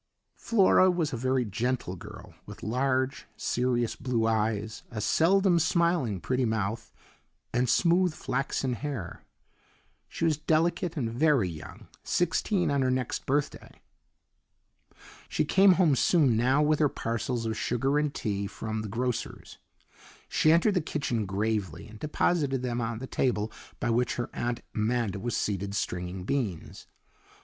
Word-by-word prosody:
Flora 190 -4 +4
was 170 -5 0
a - - 0
very 130 +1 0
gentle 115 -2 -2
girl, 85 - -11
with - - -10
large, 130 +3 0
serious 120 -1 0
blue 125 -3 -1
eyes, 110 -1 -1
a 110 - -5
seldom 175 - +3
smiling, 165 - +1
pretty 130 +7 -1
mouth, 110 0 -2 0.6
and 125 0 +1
smooth 180 +4 +3
flaxen 135 -2 -2
hair. 120 - -5 0.9
She - - -2
was 155 -3 +2
delicate 160 +2 0
and 115 -5 -2
very 140 -5 +3
young 80 -3 -9 0.2
sixteen 175 +1 +1
on 140 -1 +1
her 130 - +2
next 130 -1 -2
birthday. 145 +2 -2 1.5
She - - 0
came 190 +4 +6
home 170 -6 +3
soon 140 -4 +3
now 130 +6 +3
with 150 0 +2
her 150 -2 +4
parcels 115 0 -3
of 110 -1 -1
sugar 135 +6 0
and 150 -1 0
tea 100 -6 -3
from 110 +1 -4
the 110 - -6
grocer's. 120 +2 -4 0.7
She 155 - +3
entered 170 +6 +4
the 180 - +1
kitchen 125 -9 -2
gravely 100 -2 -2
and 110 -1 -13
deposited 145 -3 0
them 120 -1 -1
on 115 0 -2
the 130 - -6
table 110 -5 -1 0.3
by 120 - 0
which 120 +1 +1
her 120 - -4
Aunt 120 0 -2
Amanda 110 -2 -1
was 120 +3 -2
seated 100 0 -2
stringing 90 -1 -3
beans. 105 - -3
125 Hz, 145 wpm, -28 LUFS, 110-150 Hz, 1.5 s, came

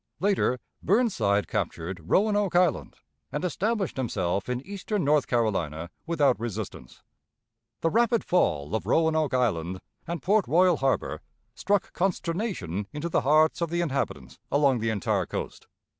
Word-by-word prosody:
Later, 190 -8 +2 0.2
Burnside 150 - +2
captured 85 +1 -3
Roanoke 205 - +2
Island, 175 -5 +2 0.4
and 145 +6 -2
established 200 +1 -1
himself 100 -5 -1
in 125 +1 -3
eastern 200 0 -3
North 150 -1 +3
Carolina 85 - -1 0.2
without 145 -10 +2
resistance. 110 -3 -6 0.8
The 165 - +1
rapid 235 0 +2
fall 75 - +1
of 105 -4 -2
Roanoke 160 0 +2
Island 95 -8 0 0.3
and 170 +1 -3
Port 205 +2 +3
Royal 180 0 +4
Harbor 135 0 -1 0.3
struck 205 +1 0
consternation 170 - -2
into 150 +3 -4
the - - +2
hearts 155 +5 +3
of 170 - 0
the 170 +1 0
inhabitants 140 -5 -3
along 140 -3 +3
the 115 +1 -1
entire 105 -4 0
coast. - - -6
150 Hz, 135 wpm, -27 LUFS, 110-180 Hz, 0.8 s, Royal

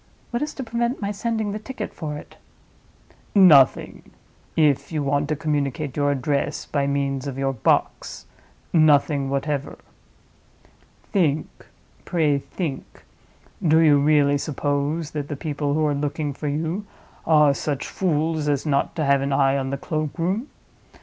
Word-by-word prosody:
What 240 - -2
is 300 0 -3
to 270 - -4
prevent 235 +2 -2
my 200 -1 -2
sending 220 0 -2
the 210 - -4
ticket 265 +5 -6
for 150 -3 -5
it?" - - -12 1.0
"Nothing—if 150 -3 +3
you 155 -2 -1
want 145 +1 0
to 155 - +1
communicate 145 -2 -2
your 145 -1 +1
address 140 +1 -1
by 140 -1 -1
means 140 -1 -1
of 135 -2 -5
your 135 0 0
box—nothing 145 +3 0
whatever. 140 +1 -2 1.3
Think; 155 -6 -1 0.4
pray 150 -5 +1
think! 145 -2 -6 0.6
Do 160 -1 +4
you 155 -3 +5
really 145 -1 +3
suppose 145 +2 -2
that 145 -2 -4
the 145 - -4
people 145 -2 -2
who 155 0 +1
are 150 - +1
looking 145 +1 -2
for 150 - -5
you 165 +8 -2 0.4
are 150 -3 +5
such 140 0 -3
fools 160 -3 -1
as 145 0 0
not 140 -2 0
to 155 - -1
have 140 0 +3
an 140 +1 -2
eye 135 0 +3
on 135 -1 -2
the 140 - -2
cloakroom? 165 - -2
150 Hz, 145 wpm, -23 LUFS, 140-160 Hz, 1.3 s, you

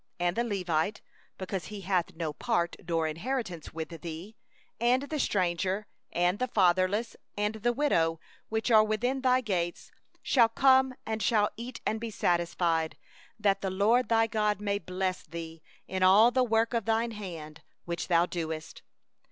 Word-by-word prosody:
29And 175 0 +1
the 235 - +1
Levite, 185 -4 -1 0.4
because 185 -2 -4
he 210 -1 -7
hath 185 -1 -1
no 160 -2 -3
portion 170 +3 -1
nor 165 -2 +1
inheritance 180 - -4
with 160 0 -5
thee, 170 +6 -7 0.4
and 245 +3 +3
the 300 +1 -4
stranger, 185 0 0 0.3
and 175 +3 +1
the 255 - 0
fatherless, 190 +2 +2 0.2
and 210 +1 0
the 220 +2 0
widow, 165 - +1 0.3
that 220 +2 -1
are 215 -1 +7
within 245 +5 -1
thy 255 0 +3
gates, 175 -7 -3 0.3
shall 235 -4 +4
come, 265 +2 +4
and 220 0 -3
shall 210 -3 +2
eat 240 +3 -7
and 220 0 -1
be 230 - -3
satisfied; 170 -4 0 0.4
that 200 -2 +2
the 195 - -1
LORD 215 +7 +2
thy 225 -1 +4
God 210 -2 0
may 200 -1 -1
bless 185 +1 -2
thee 165 0 -8 0.3
in 185 0 -3
all 200 +6 +7
the 255 +1 +3
work 225 0 +1
of 230 -4 0
thy 225 +1 +1
hand 165 -7 -8 0.2
which 170 0 -3
thou 170 -1 +4
doest. 160 -3 -5
200 Hz, 160 wpm, -29 LUFS, 175-225 Hz, 0.4 s, are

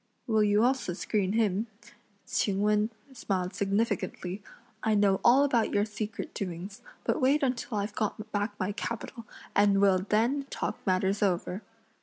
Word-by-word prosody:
"Will 220 -2 +3
you 210 +1 +3
also 255 -7 +1
screen 195 +1 -1
him?" 215 -1 +1 0.6
Ch'ing 200 -1 0
Wen 210 +1 +2 0.2
smiled 190 -6 -2
significantly; 200 -2 -1 0.4
"I 220 -1 +2
know 200 -2 +3
all 255 +4 +6
about 240 -6 +2
your 205 0 +3
secret 215 0 -5
doings, 190 +4 -5 0.2
but - - 0
wait 280 +3 +3
until 250 -3 -1
I've 205 +1 -2
got 215 0 -3
back 205 0 -2
my 185 +2 -1
capital, 230 +2 -5 0.3
and 200 -1 +4
we'll 195 -2 +4
then 230 +8 +1
talk - - -3
matters 190 +2 +1
over!" 185 0 0
210 Hz, 150 wpm, -29 LUFS, 195-225 Hz, 0.6 s, all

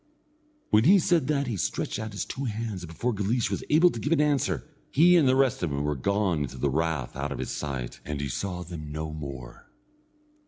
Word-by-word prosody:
When 110 +2 +5
he 195 +6 +8
said 175 -6 +2
that 140 -2 +1
he 120 -4 -2
stretched 95 - -2
out 110 -1 -5
his 100 - -3
two 135 - -5
hands, 110 -4 -3
and 85 - -7
before 120 +9 -1
Guleesh 105 +2 0
was 100 - -2
able 170 +4 +6
to 115 - -6
give 145 - -2
an 165 - +4
answer, 150 -1 +1 0.2
he 175 +5 +5
and 160 -6 +5
the 130 - +4
rest 135 -1 +2
of 85 - 0
them 70 0 -2
were 75 0 0
gone 100 +2 +1
into 65 -2 -4
the 70 +2 0
rath 80 -3 -1
out 70 +1 -3
of 70 - -3
his - - -4
sight, 65 -4 -4
and 75 -1 -4
he 70 - -2
saw 90 +6 -3
them 80 -4 -8
no 75 +1 -4
more. 70 -5 -8
100 Hz, 230 wpm, -27 LUFS, -, 0.2 s, he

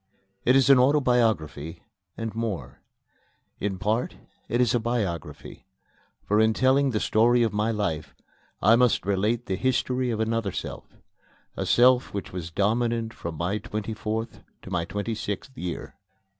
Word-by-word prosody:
It 130 - +5
is 135 0 +5
an 135 - +7
autobiography, 115 - +1 0.3
and 115 -2 -4
more: 110 -4 -4 0.8
in 100 -2 -2
part 110 +5 -1 0.3
it 120 - 0
is 120 -2 +3
a 120 - +3
biography; 110 -9 -4 0.6
for, 105 +1 +2
in 110 0 +3
telling 135 +2 +3
the 110 -4 0
story 120 +3 +3
of 110 -2 0
my 105 +2 +1
life, 100 -9 -2 0.5
I 115 - +7
must 125 -4 +3
relate 105 +5 0
the 95 - -2
history 130 +2 0
of 110 -2 -2
another 110 -2 0
self - - -6 0.7
a - - -3
self 125 -1 +4
which 100 - -5
was 90 -2 -5
dominant 115 +4 0
from 85 -1 -6
my 90 +6 -1
twenty 105 +1 -4
fourth 110 +1 -4 0.2
to 95 - -10
my 85 -2 0
twenty 105 +5 -3
sixth 110 +5 -5
year. 90 -7 -5
110 Hz, 155 wpm, -26 LUFS, 100-120 Hz, 0.8 s, an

